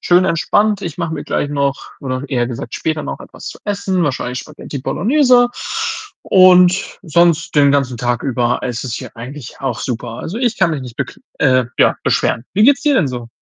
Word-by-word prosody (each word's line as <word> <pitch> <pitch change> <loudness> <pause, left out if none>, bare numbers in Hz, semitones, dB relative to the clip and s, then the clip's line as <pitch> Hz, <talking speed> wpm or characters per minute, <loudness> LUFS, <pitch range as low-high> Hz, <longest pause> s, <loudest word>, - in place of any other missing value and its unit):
schön 180 +1 +4
entspannt. 200 +4 +1
Ich 170 -1 -5
mache 165 -2 -2
mir 145 - -6
gleich 145 - -1
noch 140 -1 -2
oder 130 -1 -3
eher 120 -4 0
gesagt 120 -1 -6
später 155 -1 -2
noch - - -6
etwas - - -10
zu - - -9
essen, 200 -3 -1
wahrscheinlich 125 -3 -2
Spaghetti 150 -1 -8
Bolognese. 245 - +3 0.7
Und 185 0 +5
sonst 170 -1 +2
den 140 -1 +5
ganzen 135 -3 +1
Tag 120 0 -1
über 125 -2 0
ist 125 0 -3
es 120 - -4
hier - - -7
eigentlich 125 +2 -9
auch 135 - -2
super. 120 -1 -4
Also, 200 +7 -5
ich 240 -3 0
kann 190 -3 +3
mich 155 -3 -2
nicht 125 -2 -10
bekl 130 -2 -5 0.2
äh, 130 -3 +3
ja, - - +4
beschweren. 115 - 0
Wie 205 - +3
geht's 280 +2 +4
dir 295 -1 +3
denn 175 - +2
so? 120 -2 -6
145 Hz, 195 wpm, -17 LUFS, 130-185 Hz, 0.7 s, Und